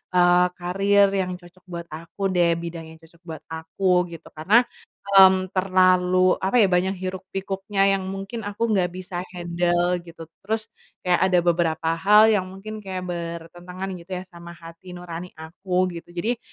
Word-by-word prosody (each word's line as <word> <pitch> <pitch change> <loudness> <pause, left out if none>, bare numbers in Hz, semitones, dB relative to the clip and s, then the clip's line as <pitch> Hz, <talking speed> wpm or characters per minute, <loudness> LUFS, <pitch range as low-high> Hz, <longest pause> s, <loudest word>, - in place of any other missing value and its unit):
eee, 180 0 +5
karier 195 +3 +2
yang 185 -2 -1
cocok 180 +1 -17
buat 170 -1 -6
aku 170 +5 -4
deh, 170 -2 +2
bidang 170 -1 -6
yang 160 - -12
cocok 165 +1 -21
buat 160 -2 -8
aku, 180 +3 0
gitu. 165 - -14
Karena, 205 +11 +3 0.6
mmm, 185 -1 +6
terlalu, 185 -1 +3
apa 190 +6 -1
ya, 200 - +5
banyak 185 +2 +1
hiruk-pikuknya 195 +2 -2
yang 190 -1 -6
mungkin 195 +3 -6
aku 220 +3 -2
nggak 185 -4 +2
bisa 185 -1 -6 0.2
handel 175 +1 0
gitu, 170 -1 -12 0.2
terus 220 0 -3 0.3
kayak 180 -1 +2
ada 180 -1 +3
beberapa 165 -2 +1
hal 210 +4 +6
yang 190 -3 +1
mungkin 205 +3 -8
kayak 190 -3 -6
bertentangan 175 +2 -6
gitu 170 +3 -16
ya 180 - -5
sama 170 0 -11
hati 165 +2 -12
nurani 175 0 -8
aku, 180 +3 -2
gitu. 170 0 -10
Jadi, 225 +7 -1
180 Hz, 160 wpm, -23 LUFS, 170-195 Hz, 0.6 s, mmm